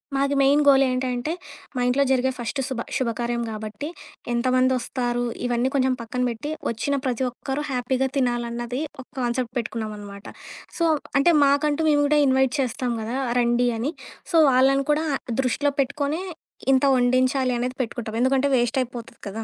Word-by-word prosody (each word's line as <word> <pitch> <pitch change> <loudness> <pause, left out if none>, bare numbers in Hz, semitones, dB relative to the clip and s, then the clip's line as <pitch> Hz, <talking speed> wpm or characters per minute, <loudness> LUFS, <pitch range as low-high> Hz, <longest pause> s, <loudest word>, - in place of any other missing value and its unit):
మాది 280 +1 +1
main 280 +2 +4
goal 275 -1 +7
ఏంటంటే, 255 +3 -1 0.4
మా 250 - -1
ఇంట్లో 275 +3 +3
జరిగే 260 0 +2
ఫస్ట్ 240 +3 -4
శుభ 260 -3 -4 0.2
శుభకార్యం 235 -1 -1
గాబట్టి, 215 +5 -6 0.5
ఎంతమంది 255 +2 +2
వస్తారు 245 0 -2 0.2
ఇవన్నీ 245 +1 +1
కొంచం 260 -1 +3
పక్కన 250 +2 -4
పెట్టి, 235 +7 -5 0.2
వచ్చిన 235 +5 -1
ప్రతి 255 0 -1
ఒక్కరు 270 +4 -4
హ్యాపీగా 255 +1 0
తినాలన్నది 240 0 -1 0.2
ఒక - - -16
కాన్సెప్ట్ 245 -1 -1
పెట్టుకున్నామనమాట. 210 -3 -5 0.5
సో, 335 - +2 0.3
అంటే 340 +5 +4
మాకంటూ 290 +2 +2
మేము 290 -1 +4
కూడా 300 0 +3
ఇన్వైట్ 265 -1 +3
చేస్తాం 250 -1 -1
కదా, 230 +4 -4 0.2
రండి 240 +1 +2
అని. 270 +9 -2 0.4
సో 335 - +3
వాళ్ళని 270 +2 +3
కూడా 310 +2 +1 0.4
దృష్టిలో 285 +3 0
పెట్టుకొని, 285 +5 -2 0.5
ఇంత 265 +1 +3
వండించాలి 255 +1 +2
అనేది 250 +1 -2
పెట్టుకుంటాం. 225 -2 -6
ఎందుకంటే 265 +2 +3
వేస్ట్ 240 +1 0
అయిపోతది 240 -2 -7
కదా! 220 +3 -5
255 Hz, 150 wpm, -24 LUFS, 240-275 Hz, 0.5 s, goal